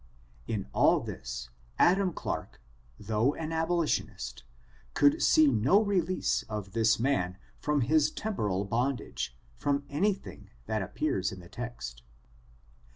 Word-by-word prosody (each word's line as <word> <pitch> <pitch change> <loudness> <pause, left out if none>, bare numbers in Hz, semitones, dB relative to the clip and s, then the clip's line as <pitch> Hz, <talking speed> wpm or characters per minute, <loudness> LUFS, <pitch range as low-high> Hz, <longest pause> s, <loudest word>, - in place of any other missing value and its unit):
In 105 -4 -2
all - - +4
this, - - -6 0.3
Adam 185 +1 +4
Clarke, - - -5 0.4
though 110 +6 +1
an 160 0 -4
abolitionist, 165 - -1 0.5
could 145 0 +4
see 155 - +6
no 135 - +4
release 185 -4 +1
of 105 -3 -4
this 110 +1 +3
man 95 -9 0 0.2
from 150 -1 +1
his 155 +4 +3
temporal 105 - -2
bondage, 115 - -2 0.2
from 140 0 0
anything 190 +7 -1 0.2
that 110 -1 -1
appears 95 -1 -1
in 95 - -8
the 85 -1 -13
text. 110 - -6
125 Hz, 120 wpm, -30 LUFS, 100-155 Hz, 0.5 s, see